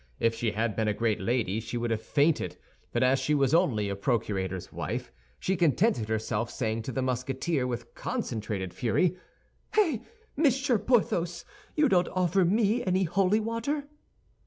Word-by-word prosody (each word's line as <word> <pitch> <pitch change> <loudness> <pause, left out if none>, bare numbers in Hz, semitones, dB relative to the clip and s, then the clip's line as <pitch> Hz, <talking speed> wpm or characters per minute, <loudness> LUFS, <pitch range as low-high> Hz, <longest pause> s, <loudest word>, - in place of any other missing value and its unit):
If 115 0 +2
she 115 -1 -1
had 110 0 -1
been 110 -1 0
a 105 - +1
great 115 -2 0
lady 110 -1 0
she 115 +2 -5
would 120 0 -1
have 110 -1 0
fainted; 150 +5 +1 0.3
but - - +1
as 130 +1 +4
she 150 - +1
was 135 -1 +2
only 130 - +3
a 100 - -2
procurator's 100 -5 -2
wife, - - -4 0.3
she 190 - 0
contented 170 - +2
herself 110 +1 -1
saying 110 -1 -2
to 120 - -5
the 130 +2 -1
Musketeer 130 +3 -1
with 120 -1 -5
concentrated 105 - -3
fury, 160 - +1 0.6
"Eh, 330 - +3 0.4
Monsieur 270 -5 +2
Porthos, 175 -7 +1 0.3
you 300 -1 +4
don't 180 -6 +3
offer 185 +1 +2
me 210 +5 +2
any 185 0 +2
holy 190 +4 +2
water?" 230 +7 -2
135 Hz, 160 wpm, -28 LUFS, -, 0.6 s, as